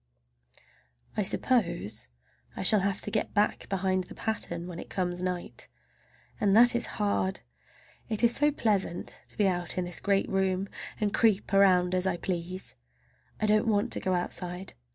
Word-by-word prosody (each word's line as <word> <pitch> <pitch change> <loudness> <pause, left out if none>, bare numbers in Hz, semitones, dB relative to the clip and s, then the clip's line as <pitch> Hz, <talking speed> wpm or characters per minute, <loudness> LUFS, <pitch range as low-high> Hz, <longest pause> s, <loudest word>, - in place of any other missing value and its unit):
I 215 - +1
suppose 175 - 0 0.5
I - - -4
shall 210 +2 +6
have 195 0 -1
to 210 - -5
get 215 - -1
back 210 0 +1
behind 190 -1 0
the - - -11
pattern 175 -6 -3
when 175 -1 -7
it - - -9
comes 180 -2 -2
night, 180 -1 -3 0.7
and 205 0 +4
that 240 +1 +7
is 240 - +1
hard! 100 -2 0 0.7
It 220 +1 0
is 235 0 +5
so 295 +1 +4
pleasant 205 -10 -1
to - - -19
be 205 - +3
out 175 -2 -2
in 180 - 0
this 175 -1 -2
great 195 -1 +1
room 190 0 0 0.3
and 210 -2 0
creep 210 -3 +2
around 185 -2 +5
as 185 +1 +1
I 180 -2 0
please! 180 - -3 0.7
I - - +1
don't 215 +2 +3
want 215 +2 +1
to - - 0
go 185 -1 0
outside. 180 +1 -4
190 Hz, 170 wpm, -29 LUFS, 180-210 Hz, 0.7 s, that